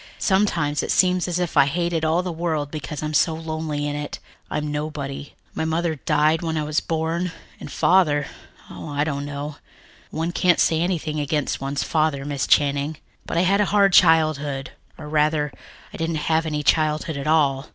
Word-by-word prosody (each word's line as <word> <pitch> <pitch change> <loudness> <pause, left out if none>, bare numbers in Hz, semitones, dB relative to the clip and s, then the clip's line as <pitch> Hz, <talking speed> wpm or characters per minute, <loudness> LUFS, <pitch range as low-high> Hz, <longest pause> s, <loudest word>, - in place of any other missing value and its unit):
Sometimes 170 -7 +1
it - - -5
seems 180 -1 +3
as 175 -1 -1
if 180 -1 -2
I 135 - +6
hated 170 +1 -1
all 160 +3 +2
the 180 - -3
world 160 -3 -2
because 150 -1 -5
I'm 155 0 -3
so 160 +2 +3
lonely 155 -2 -3
in 145 - -3
it. 145 0 -5 0.3
I'm 150 0 -2
nobody. 145 -2 -5 0.2
My - - -2
mother 160 +1 0
died 155 +2 +1
when 160 -2 -2
I 155 - 0
was 150 +1 0
born 165 +2 -2 0.3
and - - -9
Father 150 -6 +3 0.5
oh, - - -8
I 145 0 0
don't 145 -2 -3
know. 145 +1 -6 0.5
One 165 +2 -2
can't 175 0 +2
say 160 0 +3
anything 165 -4 -1
against 145 -1 -1
one's 135 +1 -2
father, 155 -3 0
Miss 145 -2 -2
Channing. 145 +1 +2 0.3
But - - -2
I - - +4
had 195 +3 +3
a - - +3
hard 200 -1 +3
childhood 155 -5 +3 0.3
or 150 - -9
rather, 150 -1 +1 0.4
I - - -7
didn't 165 0 -2 0.2
have 160 0 +2
any 150 -1 -2
childhood 155 +1 +1
at 140 +1 -4
all. 145 -3 +2
155 Hz, 185 wpm, -23 LUFS, 145-165 Hz, 0.5 s, I